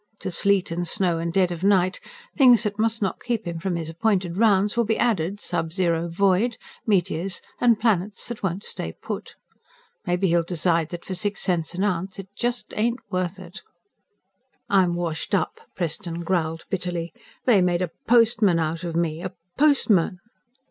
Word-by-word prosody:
To - - -3
"sleet 195 +1 +2
and 175 +1 -2
snow 175 -1 +1
and 170 0 -2
dead 180 0 +2
of 175 0 -5
night" 190 -2 +3 0.4
things 245 - +6
that 210 -1 -3
must 225 0 +1
not 195 - -2
keep 235 -4 -2
him 170 -1 -4
from 185 +1 -2
his 165 -2 -3
appointed 180 0 0
rounds 205 -1 +3
will 235 - +3
be 225 0 0
added, 200 -4 0
sub 165 -5 -3
zero 170 -2 0
void, 200 +6 +2 0.3
meteors, 185 -2 0 0.2
and 235 -3 +4
planets 210 -3 0
that 240 -2 -6
won't 190 +1 -2
stay - - -5
put. - - -6 0.7
Maybe 180 +1 +1
he'll 170 0 +4
decide 165 -1 0
that 175 -1 -7
for 190 - -4
six 205 +2 -1
cents 175 -2 0
an 185 - -1
ounce 190 -1 -1
it 195 -1 -8
just 245 0 -2
ain't 235 +3 +1
worth 185 0 -1
it._ 185 +1 -10 1.1
"I'm 185 -3 +4
washed 170 -2 -2
up," 455 - -1
Preston 170 0 -3
growled 165 -2 -1
bitterly. 175 -3 -3 0.3
"They 220 -7 +5
made 180 0 +2
a 175 - -3 0.2
postman 225 -6 +4
out 165 +1 -1
of 170 -2 -4
me. 165 -2 0
Me - - -8
a 185 0 -5 0.2
postman!" 235 - +3
185 Hz, 175 wpm, -24 LUFS, 170-205 Hz, 1.1 s, things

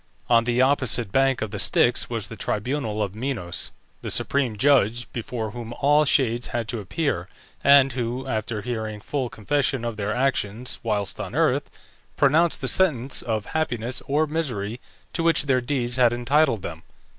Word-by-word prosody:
On 115 -1 +5
the 125 +1 +2
opposite 130 -5 +2
bank 135 -1 +2
of 110 - -5
the 105 - -4
Styx 120 - +3
was 115 -4 -3
the 115 - -8
tribunal 110 +1 -2
of 100 -2 -4
Minos, 110 -7 -3 0.3
the - - -5
supreme 130 -6 +1
judge, 120 -2 +3
before 115 -2 -4
whom 120 +1 -7
all 145 +4 +3
shades 120 -4 +2
had 115 -2 -3
to 120 - -2
appear, 100 - -2 0.3
and 140 -1 +6
who, 125 +1 -3
after 110 -3 -3
hearing 110 -3 -4
full 130 +3 -3
confession 130 +3 -1
of 115 -2 -4
their 105 0 -2
actions 125 -2 -1
whilst 105 -3 -2
on - - -5
earth, - - +1 0.5
pronounced 160 +4 +3
the 130 - -2
sentence 135 -7 +2
of 110 -3 -2
happiness 125 -6 -1
or 150 +3 +2
misery 125 -9 -3 0.3
to - - -1
which 165 -2 +3
their 130 -3 +1
deeds 125 -1 -2
had 120 -2 +4
entitled 120 -2 +2
them. - - -6
120 Hz, 170 wpm, -24 LUFS, 110-135 Hz, 0.5 s, and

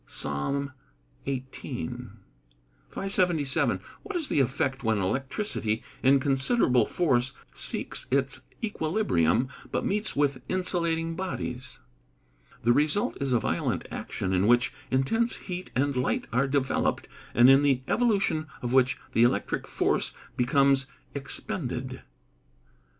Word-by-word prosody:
PSALM 140 - -2 0.5
XVIII.] 130 - -4 1.0
577. 175 -7 +1 0.2
What 410 -1 -7
is 325 -5 0
the - - +2
effect 135 +1 0
when 110 -1 +2
electricity, 115 - -1 0.2
in 135 +1 +5
considerable 135 - +3
force, 130 -7 +1 0.2
seeks - - -2
its 135 0 +1 0.2
equilibrium, 135 - +1 0.2
but - - -1
meets 210 +2 -1
with 140 -3 +1
insulating 170 -3 0
bodies? 130 -8 -5 0.8
The 120 +1 +5
result 150 +9 +2
is 135 -1 0
a 120 - +4
violent - - -1
action 95 - -3
in 95 +2 +3
which, 120 +1 +4 0.2
intense 225 - +1
heat 180 -1 -6
and 140 +2 +1
light 125 0 0
are 130 +3 +3
developed, 135 -1 0 0.3
and 120 +1 +7
in 135 +1 +7
the 135 -3 +2
evolution 200 -10 +1 0.2
of 120 0 -1
which 130 -1 +4
the 115 - +2
electric 120 +1 +1
force - - 0 0.2
becomes 135 +1 +3 0.3
expended. 130 -2 -4
135 Hz, 115 wpm, -27 LUFS, 125-165 Hz, 1.0 s, and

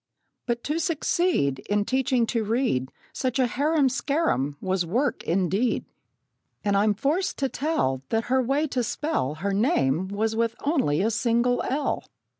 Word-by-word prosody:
But 235 -1 -1
to 305 +3 -1
succeed 325 - +1
In 205 0 +1
teaching 255 -1 +1
to 230 -1 -1
read 215 - 0 0.2
Such 255 -1 -1
a 260 - +3
harum 285 +4 +2
scarum, 260 - 0
was 185 -1 0
work 240 - -1
indeed! 195 +7 +1 0.8
And 200 -1 +1
I'm 205 +1 +3
forced 295 - 0
to 270 -1 0
tell 250 - -1
That 225 0 +1
her 260 +2 +2
way 275 +5 +1
to 250 -2 0
spell 230 - -1
Her 195 +5 -2
name 190 - +1
was 215 +3 -1
with 230 0 0
only 265 - +1
a 225 - +1
single 235 +2 +1
'l.' 280 +2 -1
235 Hz, 155 wpm, -25 LUFS, 200-275 Hz, 0.8 s, a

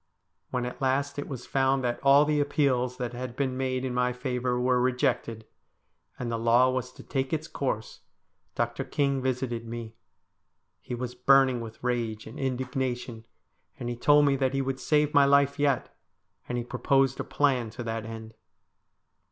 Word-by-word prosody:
When 125 -1 -2
at 125 - -7
last 135 +2 0
it 145 - -4
was 125 -3 -7
found 135 0 +1
that 120 -1 -1
all 140 +2 +6
the 150 0 +1
appeals 130 -4 +1
that 125 -1 -4
had 125 0 -6
been 130 -2 -1
made 130 0 -1
in 130 - -2
my 125 0 +1
favour 125 -1 -2
were 125 0 +2
rejected, 120 -3 0 0.7
and 120 -2 -4
the 115 - -1
law 120 +3 +4
was 130 -1 -3
to - - -13
take 135 -1 -2
its 155 0 -2
course, 130 -8 -3 0.6
Dr. 120 +2 -1
King 140 0 0
visited 125 -3 -2
me. 115 -1 -6 0.9
He 125 - -5
was 125 0 -5
burning 130 0 +4
with 110 0 -9
rage 115 -3 -2
and 110 - -9
indignation, 125 -3 -3 0.5
and 120 - -4
he 120 - -3
told 145 +4 +5
me 140 -1 +3
that 135 0 0
he 135 - +1
would 135 0 -3
save 150 +2 +2
my 140 -2 +6
life 140 0 +3
yet, 140 -3 0 0.5
and 120 - -1
he 120 - -2
proposed 135 +2 +1
a - - -1
plan 130 -6 +1
to 120 +2 -7
that 115 -1 -3
end. 110 0 -8
125 Hz, 175 wpm, -28 LUFS, 120-135 Hz, 0.9 s, all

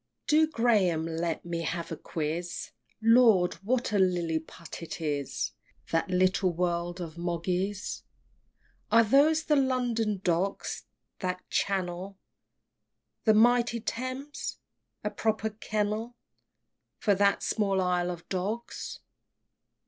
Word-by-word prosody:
V. - - -11
Do, 310 0 +5
Graham, 210 - +2
let 165 0 -2
me 170 -1 -2
have 165 +1 -3
a - - -2
quiz; 165 +2 -4 0.3
Lord! 225 -6 +6
what 245 +3 0
a 205 - +3
Lilliput 170 -3 -1
it 165 - -6
is. 145 -3 -2 0.4
That 165 +3 +1
little 185 0 +3
world 175 0 -1
of 170 -1 -6
Mogg's! 180 +3 -2 0.9
Are 230 0 +7
those 290 +8 +4
the 300 - +2
London 245 -6 +1
Docks? 180 +3 -1 0.3
that 180 -1 -3
channel, 190 0 -1 1.1
The 220 -1 +6
mighty 235 +1 +4
Thames? 255 +5 -4 0.5
a - - -1
proper 220 0 0
kennel 215 +2 -2 0.8
For 205 - +2
that 200 +1 +3
small 195 -3 +1
Isle 180 -1 +1
of 175 -1 -6
Dogs! 205 +6 -4
195 Hz, 115 wpm, -29 LUFS, 175-230 Hz, 1.1 s, Are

